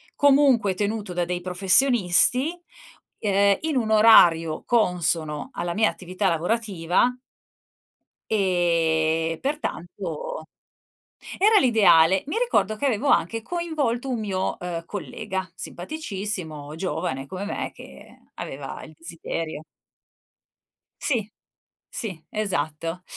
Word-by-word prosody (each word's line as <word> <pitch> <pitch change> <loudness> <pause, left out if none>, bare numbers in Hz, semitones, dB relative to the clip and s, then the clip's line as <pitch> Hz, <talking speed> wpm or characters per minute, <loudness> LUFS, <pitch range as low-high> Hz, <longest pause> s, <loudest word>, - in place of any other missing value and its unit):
Comunque 270 -8 +4
tenuto 205 0 -3
da 175 0 -1
dei 180 0 -3
professionisti, 200 - +3 0.7
ehm, 200 -1 +3
in 315 -2 -2
un 225 -3 0
orario 170 -8 +5
consono 170 -8 0
alla 175 0 -3
mia 220 +3 +3
attività 185 +2 -2
lavorativa 185 +3 0 1.2
ehm, 165 -4 +1
pertanto 180 - -4 0.9
era 425 +3 +5
l'ideale. 190 - +5
Mi 300 - -3
ricordo 465 - +1
che 280 - -1
avevo 260 +2 0
anche 225 0 +2
coinvolto 290 -5 -2
un 245 -3 -2
mio, 190 -3 -2
ehm, 170 -2 -5
collega 190 -2 -5
simpaticissimo, 180 - -6
giovane 160 -6 -3
come 185 +7 -6
me, 205 - -4
che - - -14
aveva 135 0 -7
il 155 - -13
desiderio. 165 -1 -6 1.4
Sì, 220 -7 -1 0.6
sì, 185 -8 -6
esatto. 165 -4 -3
190 Hz, 100 wpm, -24 LUFS, 165-225 Hz, 1.4 s, orario